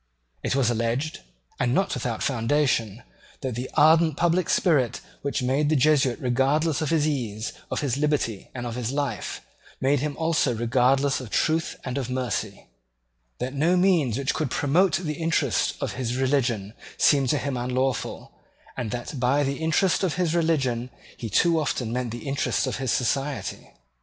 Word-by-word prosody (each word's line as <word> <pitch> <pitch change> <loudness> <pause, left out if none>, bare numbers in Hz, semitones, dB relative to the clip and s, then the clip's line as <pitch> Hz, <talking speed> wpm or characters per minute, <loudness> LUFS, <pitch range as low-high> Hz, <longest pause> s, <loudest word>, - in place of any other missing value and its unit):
It - - -1
was 130 -4 +2
alleged, 120 +7 -1 0.4
and 125 0 +1
not 195 - +1
without 120 -3 -3
foundation, 120 -3 0 0.4
that 130 -3 -3
the 125 +3 -4
ardent 160 0 +5
public 175 0 +2
spirit 145 - +2 0.2
which 140 -1 -2
made 140 +4 +1
the 155 - +3
Jesuit 135 -3 +3
regardless 135 +5 +1
of 155 - -1
his 155 -2 +2
ease, 115 -7 -3 0.2
of - - -2
his 135 -3 -1
liberty, 145 -8 -1
and 125 -1 -4
of 120 - -4
his 120 0 -3
life, 140 -7 -3 0.4
made 140 +1 +2
him 145 +1 -3
also 160 -6 +1
regardless 130 +4 +2
of 125 - -8
truth 160 +10 0
and 130 +1 -2
of 130 - -4
mercy; 120 -5 -3 0.7
that 130 +2 -4
no 165 +6 +2
means 170 - +3
which 135 -1 0
could 155 -4 -1
promote 160 +9 +2
the 155 -3 -2
interest 160 -8 +1
of - - -3
his 125 -2 -3
religion 125 -6 0 0.2
seemed 140 -3 +4
to 150 - +2
him 140 -1 -2
unlawful, 125 +1 -2 0.4
and 120 -3 -3
that 125 +4 -5
by 130 +4 +2
the 140 0 -1
interest 160 +4 +1
of 180 -5 0
his 175 -3 0
religion 135 -8 +1 0.3
he 115 - -6
too 165 - +3
often 130 -6 -2
meant 125 -1 -2
the 120 +4 -7
interest 140 +1 0
of - - -2
his 130 -3 -1
Society. 135 +3 -1
135 Hz, 170 wpm, -25 LUFS, 125-150 Hz, 0.7 s, ardent